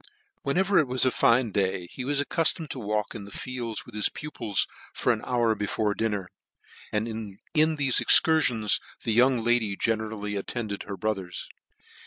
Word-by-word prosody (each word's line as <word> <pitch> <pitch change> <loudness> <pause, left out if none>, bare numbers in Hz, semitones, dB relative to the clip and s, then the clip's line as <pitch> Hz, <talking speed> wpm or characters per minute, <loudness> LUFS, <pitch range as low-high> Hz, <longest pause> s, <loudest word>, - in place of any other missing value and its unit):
Whenever 190 +7 +2
it 150 - +2
was 125 +1 +1
a 130 - +3
fine 115 -1 +3
day, 95 -3 0
he 130 - -6
was 140 +2 0
accuftomed 160 +1 +1
to 130 - -5
walk 105 -1 -2
in 105 -3 -7
the - - -11
fields 120 -3 -4
with 120 - -14
his 105 -1 +1
pupils 115 - -2 0.3
for - - +2
an - - -5
hour 120 -3 +2
before 105 0 -1
dinner, 105 -4 -2 0.6
and 105 +2 0
in 110 -3 -6 0.2
thefe 150 -4 +3
excursions 125 -10 +4 0.2
the 115 - 0
young 125 0 +4
lady 115 -4 +2
generally 110 -1 -2
attended 100 +1 -4
her 100 -1 -5
brothers. 95 -5 -3
115 Hz, 165 wpm, -27 LUFS, 105-130 Hz, 0.6 s, excursions